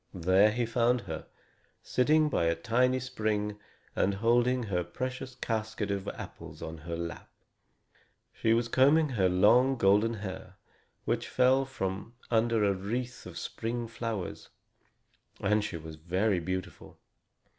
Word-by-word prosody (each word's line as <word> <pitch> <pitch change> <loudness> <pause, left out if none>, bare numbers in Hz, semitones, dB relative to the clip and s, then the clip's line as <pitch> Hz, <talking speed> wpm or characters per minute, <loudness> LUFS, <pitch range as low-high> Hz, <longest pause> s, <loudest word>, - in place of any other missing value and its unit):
There 95 +4 +4
he 120 +2 0
found 120 +1 +2
her, 80 -8 -7 0.6
sitting 155 +4 +3
by 110 - +1
a 85 0 +2
tiny 125 +8 +2
spring, 105 -4 -2 0.4
and 100 +1 +1
holding 120 +4 +2
her 90 -5 -1
precious 125 +7 -5
casket 110 -4 -2
of 100 -1 -3
apples - - -8
on 80 0 -6
her 85 +2 -5
lap. 85 0 -6 1.0
She 110 - 0
was 115 0 +1
combing 145 +6 +4
her 100 -8 +2
long 120 +9 +5
golden 105 +2 +3
hair, 100 -3 -7 0.5
which - - -1
fell 130 +1 +3
from 100 -2 -4 0.2
under 115 -1 +3
a 100 -1 +3
wreath 120 +6 -4
of - - -9
spring 115 +1 -4
flowers, 115 -4 -5 0.9
and 105 +1 +2
she 95 -5 -4
was 80 -1 -9
very 90 +5 0
beautiful. 95 +2 -5
110 Hz, 135 wpm, -30 LUFS, 95-125 Hz, 1.0 s, long